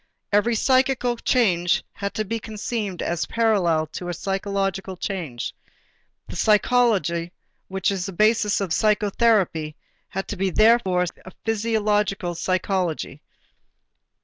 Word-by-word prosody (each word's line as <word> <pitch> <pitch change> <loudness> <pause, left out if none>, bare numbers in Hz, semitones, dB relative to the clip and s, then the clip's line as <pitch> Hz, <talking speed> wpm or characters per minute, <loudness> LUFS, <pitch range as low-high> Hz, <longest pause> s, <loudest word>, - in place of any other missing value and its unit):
Every 215 +3 +3
psychical 255 0 +2
change 180 -9 +2
had 200 0 -5
to 215 -1 -1
be 230 +3 -3
conceived 215 -3 -4
as 170 0 -2
parallel 190 -9 +2
to 175 - -5
a - - -2
physiological 195 +1 -2
change. 165 -12 -4 0.7
The - - -8
psychology 205 -7 +2 0.3
which 190 0 0
is 190 -2 -2
to - - -5
be - - -12
the - - -17
basis 215 -1 +3
of 185 -4 -1
psychotherapy 205 -7 +2 0.3
had 195 +1 -4
to - - -3
be 195 0 0
therefore 195 -3 +4 0.2
a 185 - -11
physiological 210 -4 0
psychology. 180 -4 -2
200 Hz, 125 wpm, -23 LUFS, 180-220 Hz, 0.7 s, therefore